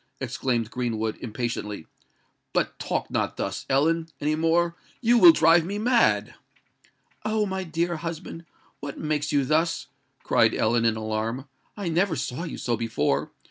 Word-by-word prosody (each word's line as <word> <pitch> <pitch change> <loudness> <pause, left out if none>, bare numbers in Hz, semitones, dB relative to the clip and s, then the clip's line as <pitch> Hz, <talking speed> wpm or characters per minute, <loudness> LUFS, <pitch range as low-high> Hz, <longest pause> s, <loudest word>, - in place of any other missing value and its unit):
exclaimed 120 -3 -1
Greenwood, 110 -3 -2
impatiently. 105 -5 -4 0.7
"But - - 0
talk - - -2
not - - -1
thus, - - -4
Ellen, 160 +5 +2
any 150 +1 0
more: 165 +2 +2 0.2
you 240 0 +4
will 340 - +10
drive 165 - +5
me 195 +5 -4
mad!" 235 +3 +2 0.9
"Oh! 215 0 +1
my 190 -1 -3
dear 170 0 -1
husband, 165 0 -6 0.3
what 140 -1 -6
makes 150 -1 -1
you 140 -2 +2
thus?" 160 +4 0 0.3
cried - - +3
Ellen, 115 +1 +2
in 115 -1 +3
alarm: 110 +4 -3 0.3
"I 200 -3 -3
never 170 +1 +1
saw 130 +5 -3
you 165 - -6
so 120 - -1
before. 115 -12 -1
155 Hz, 145 wpm, -25 LUFS, 120-170 Hz, 0.9 s, will